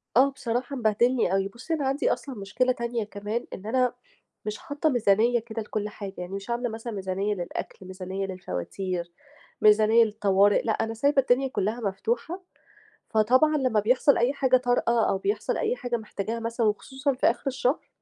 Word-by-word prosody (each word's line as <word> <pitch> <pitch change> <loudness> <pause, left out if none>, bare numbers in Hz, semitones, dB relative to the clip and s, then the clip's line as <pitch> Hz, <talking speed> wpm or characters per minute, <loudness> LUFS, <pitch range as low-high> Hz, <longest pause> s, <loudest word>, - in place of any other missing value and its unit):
آه، 265 +3 +6
بصراحة 250 +2 -3
مبهدلني 235 -2 +2
أوي. 195 0 +1
بُصّي، 235 +11 -6
أنا 290 -4 0
عندي 275 +3 +1
أصلًا 270 -3 -7
مشكلة 215 +5 0
تانية 235 -2 -2
كمان 210 +3 -4
إن 195 - -8
أنا 250 +2 +1 0.5
مش 210 0 -3
حاطة 290 +2 -1
ميزانية 235 -1 +3
كده 225 0 -6
لكل 210 -1 -3
حاجة 200 -2 -7
يعني 180 +1 -6
مش 200 +3 -6
عاملة 240 +1 -1
مثلًا 225 +1 -6
ميزانية 195 +1 -2
للأكل، 180 +1 -6
ميزانية 185 +1 -4
للفواتير، 180 - -4 0.5
ميزانية 215 +2 +6
للطوارئ، 205 -2 +3
لأ 225 - 0
أنا 225 +1 -1
سايبة 280 +4 +3
الدنيا 260 +1 +2
كلها 220 -2 -2
مفتوحة 345 - -2 0.7
فطبعًا 255 +8 +4
لمّا 255 -6 +2
بيحصل 250 +6 +3
أي 240 +3 +2
حاجة 260 -2 +3
طارئة 245 -2 +2
أو 190 - +1
بيحصل 410 - -1
أي 470 +2 0
حاجة 245 - -2
محتاجاها 220 +1 -4
مثلًا 230 0 -1
وخصوصًا 265 +6 -1
في 255 - +1
آخر - - -5
الشهر، 265 +1 0
230 Hz, 170 wpm, -26 LUFS, 205-255 Hz, 0.7 s, آه